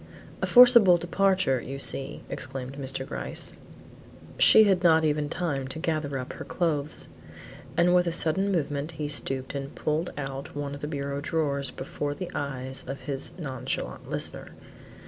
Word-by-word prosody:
"A - - 0
forcible 235 -7 +8
departure 185 -5 +1
you 135 +3 -6
see," 135 0 -1
exclaimed 130 0 -6
Mr. 135 -1 -3
Gryce; - - 0 0.9
"she 220 - +8
had 190 -4 +3
not 160 -2 +5
even 150 -1 0
time 145 -7 -2
to 135 - -5
gather 155 -4 -2
up 130 -1 -6
her - - -7
clothes;" 155 -4 -2 0.7
and 175 +1 +4
with 180 -1 +4
a - - +1
sudden 190 +5 +1
movement 150 -2 -2
he 150 -1 -4
stooped 135 -2 -2
and 140 0 -6
pulled 155 +3 -1
out 135 -1 -6
one 145 -1 -4
of 145 - -8
the 150 - -3
bureau 140 -2 -3
drawers 140 -4 0
before 145 +3 -5
the 180 +3 -6
eyes 130 -2 -4
of 135 - -6
his 140 +2 -1
nonchalant 135 -7 -5
listener. - - -3
145 Hz, 160 wpm, -27 LUFS, 135-170 Hz, 0.9 s, forcible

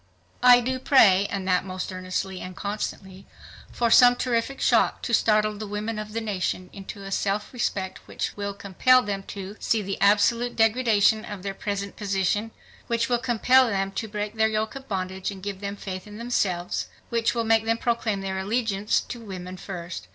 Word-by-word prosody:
"I 245 -1 +8
do 255 +2 -2
pray, 205 -8 +5
and 195 -2 -4
that 180 -1 +2
most 185 0 -5
earnestly 185 +1 -4
and 185 0 -7
constantly, 195 -1 -5 0.4
for 235 -1 0
some 245 0 +8
terrific 245 +2 -1
shock - - +2
to 235 - -3
startle 215 -1 +3
the 215 +1 -6
women 210 +2 -3
o - - -1
f 215 - -8
the 225 - -2
nation 185 -3 -3
into 195 0 -9
a 195 - -7
self 200 +3 -1
respect 195 -6 -2
which - - -4
mill 200 -1 -4
compel 250 +6 +3
them 200 -1 -3
to, 200 +1 -7
see 220 -2 0
the 195 0 -4
absolute 215 +4 +3
degradation 225 -1 +3
o - - -9
f 190 -3 -9
their 195 -1 -3
present 200 0 -4
position; 200 +1 0 0.4
which 235 +1 0
will 240 -1 +2
compel 250 +2 +4
them 195 -2 -1
to 220 +3 -4
break 210 0 -4
their 220 0 +4
yoke 220 0 -1
of 270 0 -9
bondage 190 -1 -3
and 195 -2 -9
give 200 -1 -5
them 200 0 -4
faith 185 -1 -7
in 210 0 -10
themselves; 195 -7 -1 0.2
which 230 0 0
will 230 - 0
make 225 0 +3
them 225 0 +1
proclaim 230 -4 -1
their 190 0 -3
allegiance 210 0 0
to 240 - -8
women 185 -4 -7
first 180 - -7
205 Hz, 195 wpm, -25 LUFS, 195-230 Hz, 0.4 s, I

